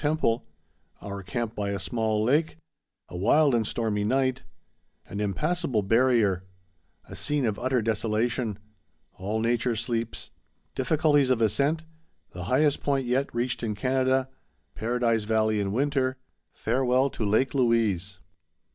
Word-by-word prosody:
Temple—Our 100 - -3
Camp 115 +3 -3
by 100 -2 -3
a 100 - -1
Small 110 -1 -1
Lake—A 140 - -3
Wild 140 - +3
and 115 -3 +1
Stormy 110 -3 -1
Night—An 130 -5 -4
Impassable 135 - 0
Barrier—A 95 - -1
Scene 145 -3 0
of 105 -2 -1
Utter 130 -2 0
Desolation—All 110 -2 -3
Nature 120 +1 +1
Sleeps—Difficulties 130 +5 -1
of 130 -3 +2
Ascent—The 155 - -2
Highest 145 +6 +2
Point 140 -2 0
yet 130 +3 0
Reached 120 +1 -1
in 110 -3 -2
Canada—Paradise 125 -2 -1
Valley 110 -1 +1
in 100 -1 -1
Winter—Farewell 130 0 -1
to - - -4
Lake 110 +6 +2
Louise. 110 -8 +1
115 Hz, 100 wpm, -27 LUFS, 105-130 Hz, -, Wild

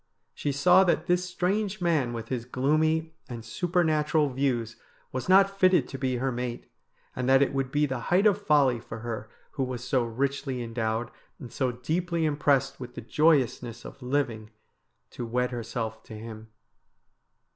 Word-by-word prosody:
She 145 - -2
saw 180 +7 +5
that 170 -2 +1
this 180 +1 +1
strange 195 +3 -1
man 160 -9 +1
with 115 -1 -6
his 125 -3 -3
gloomy 155 +5 +1 0.2
and 115 -2 -7
supernatural 155 0 +1
views 125 -4 -1 0.3
was 130 +7 -4
not 195 +1 +5
fitted 185 -8 +4
to 135 - -6
be 130 -1 0
her 130 +2 -1
mate, 120 -1 -4 0.5
and 125 0 -1
that 135 +1 +6
it 140 - -1
would 135 -1 -1
be 150 +1 +2
the 130 -3 -3
height 185 +4 +4
of 205 -1 +4
folly 140 - +3
for 110 0 -8
her 110 -2 -5 0.2
who 135 - -2
was 125 -2 -4
so 125 -1 +1
richly 130 +2 -2
endowed, 115 0 -2 0.3
and 120 - -10
so 130 -2 0
deeply 165 +6 -1
impressed 140 -2 +1
with 125 -1 -8
the - - -6
joyousness 125 -4 +1
of - - -10
living, 125 -5 -1 0.6
to - - -6
wed 125 +2 -1
herself 115 -2 -4
to 110 - -9
him. 110 0 -9
135 Hz, 165 wpm, -27 LUFS, 120-160 Hz, 0.6 s, that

